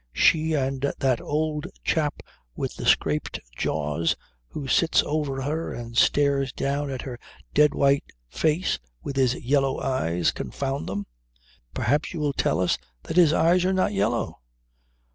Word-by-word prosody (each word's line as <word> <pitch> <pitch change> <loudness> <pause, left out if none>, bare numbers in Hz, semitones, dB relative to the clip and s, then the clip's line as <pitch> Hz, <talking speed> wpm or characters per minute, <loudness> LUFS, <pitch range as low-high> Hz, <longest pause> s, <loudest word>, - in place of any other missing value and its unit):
"She 160 0 +3
and 135 -1 -1 0.2
that 130 -3 +1
old 150 +1 -1 0.2
chap 150 -4 0 0.3
with - - -3
the - - -4
scraped 75 -1 +2 0.2
jaws 75 +3 0 0.3
who 140 - -6
sits 165 +3 +3
over 145 -3 -2
her 155 +4 -2
and 115 -1 -7
stares 140 0 +3
down 140 +3 -2
at 130 -2 -4
her 125 -3 -7 0.3
dead 150 -1 +4
white 140 0 +3 0.2
face 160 - 0 0.2
with 140 - -4
his 130 -2 +3
yellow 135 +1 +1
eyes 90 -11 0
confound 135 0 -4
them! 100 +1 -3 0.7
Perhaps 145 +6 0
you - - -3
will 145 -2 0
tell - - +1
us 90 -1 +1 0.2
that - - -4
his 170 -4 +7
eyes 175 +3 +4
are 190 +1 +2
not 185 - +1
yellow?" 105 +4 0
140 Hz, 150 wpm, -25 LUFS, 125-150 Hz, 0.7 s, his